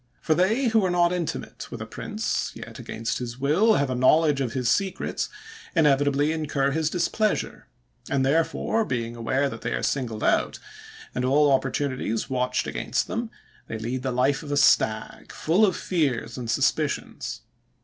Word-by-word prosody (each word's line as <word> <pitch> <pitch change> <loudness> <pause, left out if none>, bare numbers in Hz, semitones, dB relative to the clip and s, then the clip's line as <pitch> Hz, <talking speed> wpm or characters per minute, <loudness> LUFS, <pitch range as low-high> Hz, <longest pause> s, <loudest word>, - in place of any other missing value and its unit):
For 160 - +1
they 220 - +2
who 220 -2 +3
are 185 - +2
not 175 0 +3
intimate 175 -3 -4
with - - -7
a - - -5
prince, - - -3
yet, - - -9
against 115 +1 -3
his 120 -1 -5
will, 160 - +3
have 140 -2 +1
a - - +1
knowledge 140 +3 +4
of 120 -4 -2
his 125 -2 -1
secrets, 190 +9 0 0.5
inevitably 145 -1 +3
incur 145 -3 0
his 155 +1 0
displeasure; 200 +5 -1 0.4
and 135 -2 +1
therefore, 165 +9 +1
being 120 - -3
aware 130 +4 0
that 115 -4 -7
they - - -2
are - - -2
singled 115 -6 -2
out, - - +2 0.6
and 125 - -2
all 140 +3 +4
opportunities 130 -3 -1
watched 125 -1 0
against - - -1
them, 230 +1 -3 0.4
they 110 - -4
lead 120 +4 -3
the 130 0 -2
life 130 +3 +1
of 150 -2 -7
a 145 - +1
stag, 110 -5 +2
full 175 +7 +2
of 185 - -1
fears 135 -10 -1
and 120 -3 -5
suspicions. - - -1
140 Hz, 170 wpm, -25 LUFS, 125-165 Hz, 0.6 s, knowledge